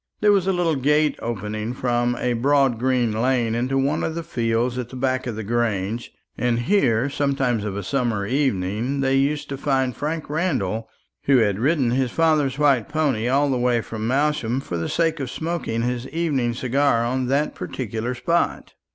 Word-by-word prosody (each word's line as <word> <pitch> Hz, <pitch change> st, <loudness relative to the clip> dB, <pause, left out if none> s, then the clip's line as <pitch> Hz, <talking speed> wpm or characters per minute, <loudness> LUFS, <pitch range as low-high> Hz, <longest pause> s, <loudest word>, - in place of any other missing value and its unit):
There 210 Hz, -, +4 dB
was 195 Hz, -2 st, +2 dB
a -, -, +4 dB
little 175 Hz, -3 st, +1 dB
gate 150 Hz, +3 st, +2 dB
opening 110 Hz, +1 st, -4 dB
from 120 Hz, -1 st, 0 dB
a 125 Hz, -1 st, 0 dB
broad 135 Hz, 0 st, +2 dB
green 125 Hz, -2 st, +1 dB
lane 115 Hz, +1 st, +1 dB
into 125 Hz, +3 st, 0 dB
one 135 Hz, +1 st, +1 dB
of 160 Hz, -, -2 dB
the 170 Hz, -, -3 dB
fields 120 Hz, -4 st, -1 dB
at 120 Hz, -1 st, -5 dB
the 130 Hz, -, -10 dB
back 130 Hz, 0 st, -1 dB
of 115 Hz, -, -3 dB
the 110 Hz, -, -5 dB
Grange; 115 Hz, -1 st, -1 dB, 0.2 s
and 120 Hz, -1 st, 0 dB
here 120 Hz, -, +2 dB
sometimes 135 Hz, -5 st, 0 dB
of 100 Hz, -2 st, -3 dB
a 100 Hz, -, -4 dB
summer 115 Hz, -3 st, -1 dB
evening 125 Hz, 0 st, 0 dB
they 135 Hz, 0 st, +1 dB
used 145 Hz, +2 st, +1 dB
to 135 Hz, -1 st, -5 dB
find 130 Hz, -4 st, 0 dB
Frank 155 Hz, +4 st, -3 dB
Randall, 115 Hz, -, -1 dB, 0.4 s
who 135 Hz, -1 st, +5 dB
had 105 Hz, -4 st, +2 dB
ridden 135 Hz, -1 st, +2 dB
his 130 Hz, 0 st, +1 dB
father's 150 Hz, -3 st, +2 dB
white 140 Hz, -7 st, +3 dB
pony 145 Hz, -7 st, 0 dB
all 140 Hz, +2 st, +2 dB
the 130 Hz, -, 0 dB
way 120 Hz, -1 st, +2 dB
from 110 Hz, -1 st, -5 dB
Malsham 135 Hz, -2 st, +1 dB
for 90 Hz, -, -5 dB
the 85 Hz, -1 st, -2 dB
sake 165 Hz, -2 st, +1 dB
of 135 Hz, -3 st, -3 dB
smoking 160 Hz, -8 st, -3 dB
his 125 Hz, +1 st, -2 dB
evening 140 Hz, -7 st, 0 dB
cigar 130 Hz, -1 st, +1 dB
on 130 Hz, +1 st, -1 dB
that 140 Hz, +3 st, +1 dB
particular 120 Hz, 0 st, -4 dB
spot. 170 Hz, +8 st, -1 dB
130 Hz, 185 wpm, -23 LUFS, 115-145 Hz, 0.4 s, who